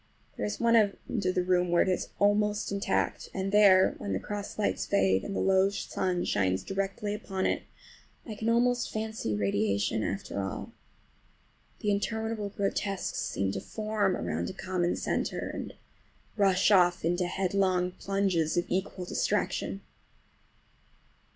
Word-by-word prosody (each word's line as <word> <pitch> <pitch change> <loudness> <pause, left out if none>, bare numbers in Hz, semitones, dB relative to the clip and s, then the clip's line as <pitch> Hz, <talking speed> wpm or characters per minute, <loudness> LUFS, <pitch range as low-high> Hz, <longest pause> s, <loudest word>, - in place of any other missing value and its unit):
There 105 - -2
is 105 - -4
one 235 0 +4
end 210 0 +1
of 185 - +1
the 180 - +2
room 180 -1 +2
where 170 0 +4
it - - -4
is 185 - -1
almost 205 +1 +2
intact, 200 0 -1
and 195 0 -2
there, 195 -2 +6
when 100 - -3
the 95 - 0
cross 205 - -6
lights 210 - 0
fade 95 -1 +2
and 195 - -4
the - - 0
low 190 0 +4
sun 185 -2 -2
shines 95 -1 +1
directly 195 +1 -2
upon 195 -2 -3
it, - - +1 0.6
I 225 - -6
can 220 +2 -2
almost 240 +1 +2
fancy 220 - -3
radiation 100 +1 0
after 100 0 -3
all,—the 95 - -8
interminable 220 +1 -2
grotesques 200 -1 -2
seem 95 0 -1
to - - -4
form 215 -3 -1
around 85 +3 -2
a - - -6
common 180 -1 -1
centre - - -2
and - - -6 0.6
rush 195 -1 +3
off 180 -4 +4
in 170 +1 +2
headlong 185 0 +1
plunges 185 -4 0
of 175 - +2
equal 185 0 -2
distraction. 100 - -1
190 Hz, 145 wpm, -29 LUFS, 175-205 Hz, 0.6 s, there